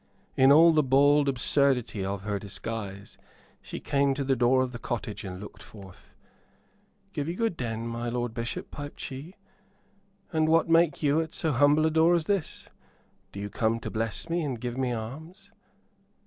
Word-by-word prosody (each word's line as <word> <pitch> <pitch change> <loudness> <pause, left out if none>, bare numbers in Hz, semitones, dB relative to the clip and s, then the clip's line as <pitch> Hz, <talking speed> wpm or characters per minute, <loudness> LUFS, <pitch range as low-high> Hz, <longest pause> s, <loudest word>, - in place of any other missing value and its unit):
In 135 +1 +6
all 165 +3 +8
the 155 - +4
bald 140 +1 +4
absurdity 125 -4 +1
of 95 0 -4
her 105 -1 -2
disguise 100 -1 -7 0.4
she - - -7
came 140 -1 +1
to 140 - -2
the 135 0 +1
door 130 +1 +3
of 130 - -4
the 120 - -8
cottage 115 -3 -4
and 90 -2 -7
looked 105 - -11
forth. 95 -4 -14 1.0
"Give 145 0 -3
you 170 - -3
good 225 -3 -1
den, 115 -4 -4
my 115 +1 -3
lord 120 -1 -2
Bishop," 115 0 -5
piped 145 -1 -8
she; 140 +8 -7 1.0
"and 155 0 +2
what 165 +1 +4
make 165 -2 +3
you 150 +2 +3
at 160 -1 -6
so 160 - -1
humble 145 +3 +4
a 160 - +2
door 160 +2 +4
as 165 -2 0
this? 195 -5 -2 0.6
Do 100 - -8
you 100 0 -5
come 115 0 0
to - - -5
bless 110 -1 -3
me 170 +1 -1
and 135 -6 -3
give 120 0 -4
me 130 -1 -1
alms?" 160 - -7
130 Hz, 180 wpm, -27 LUFS, 115-155 Hz, 1.0 s, all